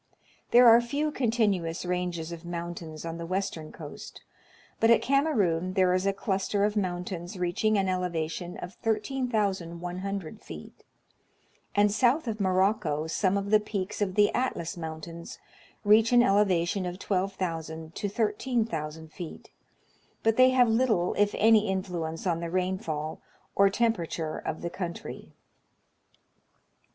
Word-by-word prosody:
There 245 +1 +7
are 230 +1 +8
few 290 +6 -1
continu 220 - +1
ous 165 +2 -5
ranges 180 -2 -2
of 170 0 -8
mountains 170 -2 -6
on 165 0 -5
the 170 - -4
western 185 -4 -3
coast; 150 -2 -10 0.6
but 225 - +4
at 230 - +5
Kamerun 200 - +1
there 185 -2 +4
is 185 +1 +1
a - - +4
cluster 195 +1 -1
of 210 0 -1
mountains 180 -2 -3
reaching 180 +5 +1
an 195 -1 +1
elevation 175 -1 -2
of 180 +2 -7
13,100 200 - -2
feet; - - -11 0.9
and 205 0 +4
south 255 +6 +2
of 220 -2 -3
Morocco 185 -5 +1
some 185 +4 +1
of 200 +1 -3
the 215 - +7
peaks 210 -1 -4
of 190 -2 0
the 205 -1 +4
Atlas 205 -9 -1
Mountains 165 0 -7 0.5
reach 215 +2 +5
an 240 -1 +6
elevation 195 -3 +2
of 180 0 -5
12,000 170 -5 -3
to 205 - -3
13,000 205 - -2
feet, 175 -3 -9 0.7
but 225 0 +3
they 255 +1 +7
have 255 -1 +4
little 225 -6 +2
if 205 0 +1
any 220 -1 +5
influence 180 -4 -3
on 170 -3 +1
the 170 0 -4
rainfall 170 -4 -2 0.3
or 200 0 +5
temperature 175 -8 -1
of - - -5
the 170 - -2
country. 175 -2 -6
190 Hz, 140 wpm, -28 LUFS, 170-215 Hz, 0.9 s, are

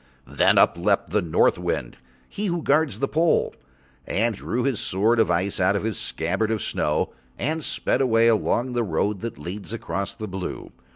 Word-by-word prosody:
Then - - +2
up - - +4
leapt - - +1
the - - +2
North 80 -2 +2
Wind, - - -3 0.3
he 210 +1 -4
who 170 -3 -2
guards 150 0 +2
the 140 - 0
pole, 160 +3 +2 0.5
and 115 +3 +1
drew 115 +4 -3
his 130 -5 0
sword 110 +5 +1
of 110 - +3
ice 90 +3 0
out 95 +2 +3
of 100 - -1
his 110 -3 -2
scabbard 95 +7 -1
of 110 -3 -1
snow 75 0 -1 0.2
and 155 +4 -2
sped - - 0
away 115 -3 +4
along 115 +2 +1
the 120 - +1
road 100 +2 -1
that 115 +3 -5
leads 95 +8 -7
across 100 -3 -4
the 110 - -6
blue. 95 -1 -6
110 Hz, 185 wpm, -24 LUFS, 95-125 Hz, 0.5 s, up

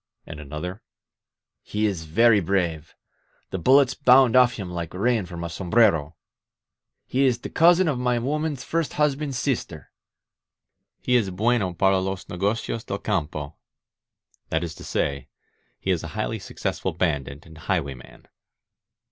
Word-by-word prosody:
And 80 -2 -9
another: 75 +7 -6 0.8
"He 105 +1 -2
is 95 -6 -2
very 110 +7 +4
brave. 85 -4 -1 0.6
The 95 - -3
bullets 130 +7 +5
bound 130 -3 +5
off 125 -1 +6
him 100 -6 -6
like 85 -1 -5
rain 110 -1 +1
from 85 -1 -7
a - - -2
sombrero.. 95 +1 +3
• 75 - -18 0.5
." - - -60
"He 135 +2 0
is 125 -2 +2
the - - -8
cousin 175 +2 +5
of 140 -5 0
my 125 -1 +1
woman's 145 +2 -2
first 165 -2 -2
husband's 145 -2 0
sister." 110 - -3 1.1
"He 125 - +2
is 110 -6 +2
bueno 105 0 0
para 95 +2 +3
los 95 0 -4
negocios 105 +4 -2
del - - -4
campo 75 -1 -3 0.9
(that 80 +2 0
is 85 -1 -5
to - - -12
say, 70 -3 -2 0.5
he - - -1
is - - 0
a - - -6
highly - - -2
successful - - -4
bandit 75 -4 -2
and 80 -1 -14
highway 80 -5 -1
man). 65 - -16
95 Hz, 155 wpm, -24 LUFS, 85-125 Hz, 1.1 s, off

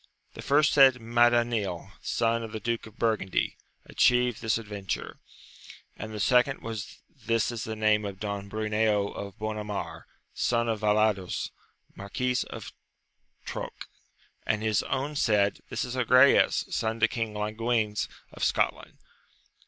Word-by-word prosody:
The - - -8
first 145 +2 +3
said, 135 -3 +7
Madanil, 120 -5 +1
son 115 0 0
of 115 -2 -7
the 110 - -3
duke 115 0 -2
of 110 - -16
Burgundy, 110 -5 0 0.3
atchieved 125 -2 +3
this 110 -1 +1
adventure: 105 -4 -5 0.8
and 110 0 -7
the 105 - -6
second 125 +5 +3
was, 110 -2 -6 0.2
this 115 0 +1
is 115 -2 -5
the 110 - -4
name 105 0 +2
of 100 -2 -6
Don 100 -1 -4
Bruneo 105 -1 0
of 100 -2 -7
Bonamar, 105 -6 -5 0.3
son 115 -1 +1
to 115 -1 0
Vallados, 105 -3 +1 0.4
Marquis 125 +6 -2
of - - -8 0.7
Troque: - - -6 0.6
and 105 0 -1
his 110 -1 +2
own 140 +3 -3
said. 105 -6 +2
This - - -2
is 125 0 -5
Agrayes, 130 +2 +5
son 110 +1 -1
to 115 - +5
King 115 -2 -3
Languines 110 0 -1 0.3
of - - -6
Scotland. - - 0
110 Hz, 135 wpm, -28 LUFS, 105-120 Hz, 0.8 s, said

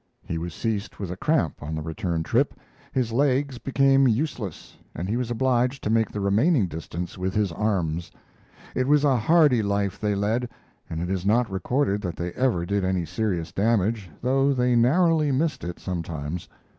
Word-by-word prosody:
He 80 - -3
was 85 -1 -5
seized 110 -3 -2
with 95 -4 -5
a - - -4
cramp 145 - 0
on 80 +2 -4
the 80 - -4
return 85 0 -2
trip. 125 - +1 0.4
His 125 -4 0
legs 135 +1 +1
became 135 0 +3
useless, 115 - -2 0.2
and 85 +4 -3
he 105 - -1
was 125 -1 -2
obliged 125 +2 +1
to 105 - 0
make 110 -1 +2
the 105 - -5
remaining 110 - +3
distance 85 +2 -6
with 95 0 -2
his 105 -4 +1
arms. 85 -4 -1 0.6
It 130 0 0
was 145 0 +4
a 140 -3 +4
hardy 135 0 +4
life 100 -2 -1
they 105 -1 0
led, 110 +5 0 0.4
and 80 +1 -3
it 90 - -3
is 95 -2 -1
not 110 +2 +2
recorded 100 +2 0
that 90 -5 -4
they 85 0 -4
ever 115 -9 0
did 100 +2 0
any 95 -2 0
serious 90 -1 -2
damage, 105 -1 +1
though 135 +2 +3
they 125 -1 +2
narrowly 155 +5 +3
missed 150 +4 0
it 85 0 -5
sometimes. 85 -2 -4
110 Hz, 180 wpm, -25 LUFS, 90-130 Hz, 0.6 s, was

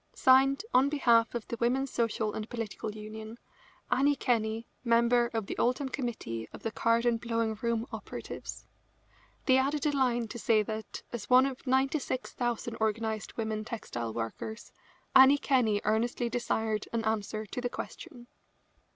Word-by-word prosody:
Signed, 270 +6 +4
on 265 +2 +5
behalf 235 -6 +3
of 235 - -4
the 235 - -4
Women's 255 +3 +1
Social 220 -2 0
and 215 0 -5
Political 220 -2 -5
Union, 220 +1 -8 0.5
Annie 285 +2 +4
Kenney, 225 -3 0 0.2
member 235 0 +3
of 225 -3 -2
the - - -4
Oldham 255 +3 +1
committee 225 - -4
of - - -11
the 225 - -2
card 230 +1 +2
and 235 -1 +2
blowing 230 -1 0
room 235 -1 0
operatives." - - -7 0.8
They 260 -1 +5
added 285 +3 0
a 300 - +3
line 240 -4 +1
to 235 - -6
say 220 -1 +3
that, 220 +1 -6
as 235 -4 -5
one 255 +1 +7
of 270 0 -5
96,000 255 -3 -1
organised 220 0 -2
women 220 -1 -2
textile 120 - -5
workers, 115 - -5 0.4
Annie 265 +2 +9
Kenney 245 -7 +2
earnestly 235 +3 0
desired 220 -3 -1
an 230 -1 -1
answer 215 0 -1
to 245 - -5
the 245 - -1
question. 250 -1 -8
235 Hz, 150 wpm, -30 LUFS, 220-255 Hz, 0.8 s, Annie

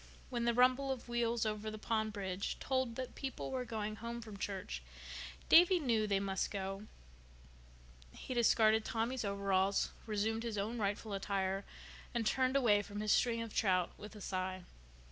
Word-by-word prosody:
When 240 -1 -1
the 235 - +3
rumble 255 +2 +4
of 260 -2 -5
wheels 235 -1 0
over 215 0 -2
the 215 - -6
pond 220 0 -1
bridge 195 -2 -3
told 260 -3 0
that 255 0 -5
people 270 -1 -5
were 260 -1 -1
going 215 -2 -3
home 235 +1 -5
from 215 -3 -9
church 190 - -4 0.7
Davy 355 +2 +7
knew 230 -7 +1
they 200 -1 +2
must 195 -1 -1
go. 195 +1 -4 1.2
He 255 - -6
discarded 220 -2 +4
Tommy's 230 +3 -1
overalls, 200 -1 +1 0.2
resumed 220 +1 0
his 230 -2 -3
own 220 +4 -2
rightful 205 +1 -1
attire, 195 0 -1 0.5
and 235 -2 0
turned 260 +4 +2
away 220 -7 +5
from 205 0 -7
his 210 0 +1
string 230 -2 +3
of 225 - -8
trout 185 -4 +2
with 210 +1 -10
a 210 - -10
sigh. 185 -1 -3
215 Hz, 165 wpm, -35 LUFS, 200-235 Hz, 1.2 s, Davy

